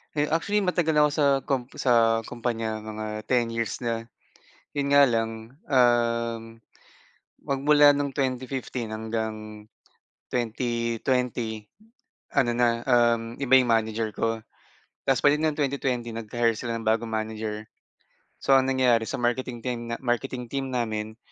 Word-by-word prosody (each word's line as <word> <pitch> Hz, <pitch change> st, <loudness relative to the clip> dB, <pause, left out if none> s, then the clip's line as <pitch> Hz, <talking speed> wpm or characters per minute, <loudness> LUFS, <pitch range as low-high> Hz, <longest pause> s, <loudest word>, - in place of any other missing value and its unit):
Eh, 150 Hz, 0 st, +1 dB
actually 205 Hz, +6 st, +1 dB
matagal 175 Hz, -4 st, +1 dB
nako 150 Hz, 0 st, +5 dB
sa 150 Hz, 0 st, +1 dB, 0.2 s
kum 130 Hz, -2 st, -1 dB
sa 115 Hz, -3 st, +3 dB
kumpanya 115 Hz, -2 st, -2 dB
mga 110 Hz, 0 st, -5 dB, 0.2 s
10 120 Hz, -2 st, +1 dB
years 115 Hz, +1 st, -3 dB
na, 115 Hz, -1 st, -2 dB, 0.7 s
'yon 140 Hz, -1 st, -1 dB
nga 140 Hz, 0 st, +7 dB
lang, 115 Hz, 0 st, -2 dB, 0.2 s
um, 115 Hz, -3 st, +1 dB, 0.8 s
magmula 145 Hz, +1 st, +4 dB
noong 140 Hz, -1 st, -1 dB
2015 130 Hz, -3 st, -3 dB
hanggang 110 Hz, -1 st, -4 dB, 0.6 s
2020 115 Hz, -1 st, -2 dB, 0.7 s
ano 130 Hz, -4 st, +4 dB
na, 120 Hz, -1 st, +1 dB
um, 120 Hz, -2 st, +2 dB
iba 130 Hz, -1 st, +5 dB
'yong 125 Hz, -2 st, +4 dB
manager 110 Hz, -1 st, 0 dB
ko 115 Hz, +1 st, -2 dB, 0.6 s
ta's 135 Hz, -, +2 dB
pagdating 150 Hz, +2 st, +4 dB
ng 150 Hz, -, -3 dB
2020 130 Hz, -4 st, -1 dB
nag-hire 115 Hz, +1 st, 0 dB
sila 115 Hz, +1 st, -4 dB
ng 115 Hz, -, -6 dB
bagong 115 Hz, +1 st, +1 dB
manager. 110 Hz, -1 st, -4 dB, 0.7 s
So 135 Hz, -, +2 dB
ang 135 Hz, 0 st, +4 dB
nangyari 125 Hz, -4 st, +2 dB
sa -, -, -3 dB
marketing 120 Hz, 0 st, -2 dB
team 120 Hz, -2 st, -2 dB, 0.2 s
marketing 120 Hz, 0 st, -2 dB
team 135 Hz, +2 st, -4 dB
namin 110 Hz, -3 st, -3 dB
120 Hz, 130 wpm, -26 LUFS, 115-130 Hz, 0.8 s, nga